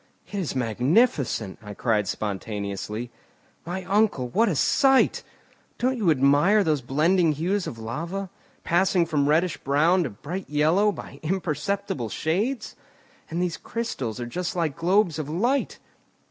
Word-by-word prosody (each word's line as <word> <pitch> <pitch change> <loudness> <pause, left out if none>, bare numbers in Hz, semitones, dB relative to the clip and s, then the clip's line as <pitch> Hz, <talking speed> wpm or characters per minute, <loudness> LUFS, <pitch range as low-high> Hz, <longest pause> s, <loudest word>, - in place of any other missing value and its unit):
"It - - -21
is 170 -7 -3
magnificent!" 125 - +1
I 105 -1 -9
cried 105 -3 +1
spontaneously. 105 +3 -4 0.6
"My 185 +2 -4
uncle, 195 - +1
what 225 - +2
a 175 - 0
sight! 270 - +3 0.6
Don't 255 +2 +1
you 210 -8 +1
admire 150 +9 +4
those 155 -5 +1
blending 155 +6 +2
hues 180 +6 -1
of 115 - -6
lava, 165 +12 -5 0.3
passing 175 0 +2
from 150 -3 +1
reddish 165 +2 +2
brown 155 +7 +2
to - - -2
bright 150 - -7
yellow 160 +8 +3
by - - -10
imperceptible 165 - -2
shades? 210 - -2 0.5
And 170 +2 -1
these 175 -2 -2
crystals 135 - -4
are 120 - -3
just 180 +10 -4
like 165 -5 -1
globes 175 -1 +2
of 150 -2 -4
light." 240 - 0
160 Hz, 140 wpm, -25 LUFS, 130-190 Hz, 0.6 s, admire